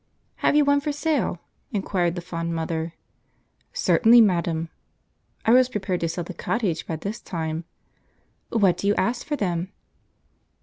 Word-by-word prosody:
"Have -, -, +2 dB
you 295 Hz, -1 st, +5 dB
one 285 Hz, 0 st, +3 dB
for 295 Hz, -, -1 dB
sale?" 290 Hz, -, -1 dB, 0.3 s
inquired 185 Hz, -4 st, 0 dB
the 175 Hz, -, -4 dB
fond 170 Hz, -1 st, -4 dB
mother. 165 Hz, 0 st, -3 dB, 0.8 s
"Certainly, 240 Hz, -, +5 dB
madam." 170 Hz, -5 st, +1 dB, 0.8 s
(I 225 Hz, -, +4 dB
was 255 Hz, +1 st, +6 dB
prepared 190 Hz, -6 st, -2 dB
to 165 Hz, -, -1 dB
sell 170 Hz, +2 st, -3 dB
the 185 Hz, -, -7 dB
cottage 185 Hz, -2 st, -2 dB
by 165 Hz, -, -2 dB
this 200 Hz, +8 st, -5 dB
time.) 160 Hz, -1 st, -4 dB, 0.8 s
"What 200 Hz, -6 st, +3 dB
do 200 Hz, -, -2 dB
you 205 Hz, -, +3 dB
ask 235 Hz, +6 st, 0 dB
for 295 Hz, -, 0 dB
them?" 180 Hz, -6 st, -2 dB
185 Hz, 150 wpm, -24 LUFS, 170-235 Hz, 0.8 s, was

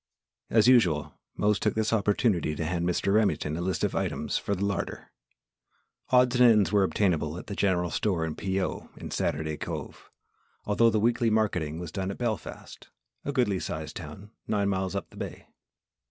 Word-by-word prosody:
As 110 Hz, 0 st, +4 dB
usual, 80 Hz, -, +4 dB, 0.2 s
Mose 105 Hz, -1 st, +2 dB
took -, -, 0 dB
this 110 Hz, 0 st, 0 dB
opportunity 100 Hz, -6 st, +1 dB
to 80 Hz, -, -3 dB
hand 85 Hz, +1 st, -1 dB
Mr. 100 Hz, +2 st, +1 dB
Remington 105 Hz, -8 st, +1 dB
a 85 Hz, -, -3 dB
list 90 Hz, -2 st, -1 dB
of -, -, +1 dB
items -, -, -2 dB
for 100 Hz, -, 0 dB
the 100 Hz, +2 st, -1 dB
larder. 100 Hz, -2 st, -3 dB, 1.0 s
Odds 125 Hz, 0 st, +4 dB
and 125 Hz, -1 st, +8 dB
ends 105 Hz, -5 st, +3 dB
were 105 Hz, -1 st, +4 dB
obtainable 85 Hz, -5 st, +1 dB
at -, -, -8 dB
the 100 Hz, -, -6 dB
General 90 Hz, -4 st, +1 dB
Store 90 Hz, -6 st, 0 dB
and 80 Hz, -, -4 dB
"P. 95 Hz, 0 st, -1 dB
O." 90 Hz, -, -3 dB
at -, -, -6 dB
Saturday 75 Hz, 0 st, -1 dB
Cove -, -, -7 dB, 0.6 s
although 115 Hz, +3 st, +4 dB
the 110 Hz, -1 st, +1 dB
weekly 120 Hz, +1 st, +2 dB
marketing 90 Hz, -8 st, 0 dB
was 85 Hz, -2 st, -6 dB
done 95 Hz, -1 st, -3 dB
at 100 Hz, -, -5 dB
Belfast, 115 Hz, -4 st, -5 dB, 0.3 s
a 145 Hz, -, -2 dB
goodly 120 Hz, -9 st, +1 dB
sized -, -, -5 dB
town 105 Hz, +2 st, -9 dB, 0.2 s
nine 100 Hz, -2 st, +1 dB
miles 95 Hz, 0 st, -1 dB
up 100 Hz, -, -3 dB
the -, -, -15 dB
bay. -, -, -7 dB
100 Hz, 185 wpm, -28 LUFS, 85-110 Hz, 1.0 s, and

